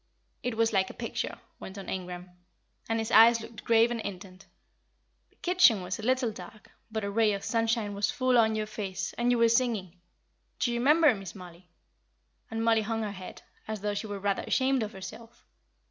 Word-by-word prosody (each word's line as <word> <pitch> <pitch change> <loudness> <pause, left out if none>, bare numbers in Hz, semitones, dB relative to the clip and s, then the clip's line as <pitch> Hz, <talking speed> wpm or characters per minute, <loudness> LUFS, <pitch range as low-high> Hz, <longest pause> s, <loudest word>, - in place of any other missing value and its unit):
"It 245 -3 -3
was 225 0 +2
like 190 -1 +2
a - - -10
picture," - - -4 0.2
went 190 - -9
on 195 - -8
Ingram, 180 -1 -6 0.6
and 225 - +1
his 225 -1 -3
eyes 230 +1 +7
looked 225 0 -10
grave 230 +1 +4
and 235 -2 -2
intent. 190 -2 -8 0.8
"The - - -33
kitchen 350 - +4
was 180 +3 -4
a - - -5
little 255 0 +1
dark, 210 +2 -12 0.2
but 220 -1 -3
a 200 - -2
ray 215 0 +3
of 200 - -4
sunshine 225 -2 0
was 200 0 0
full 255 -1 +1
on 220 -1 +3
your 215 0 -1
face, 195 -3 -5
and 240 +1 0
you 245 - +3
were 230 0 +5
singing. 225 -7 0 0.6
Do 240 - 0
you 235 - -1
remember, 300 +3 +5
Miss 195 -4 -8
Mollie?" 180 -1 -13 0.8
And 225 0 -2
Mollie 225 -1 +4
hung 225 +1 -2
her 210 - -3
head, 185 -2 -10 0.2
as 215 -2 -4
though 210 0 -1
she 205 +2 -4
were 205 -1 -5
rather 200 0 -1
ashamed 265 -1 +1
of 215 0 -4
herself. 195 +5 -11
220 Hz, 200 wpm, -29 LUFS, 195-230 Hz, 0.8 s, eyes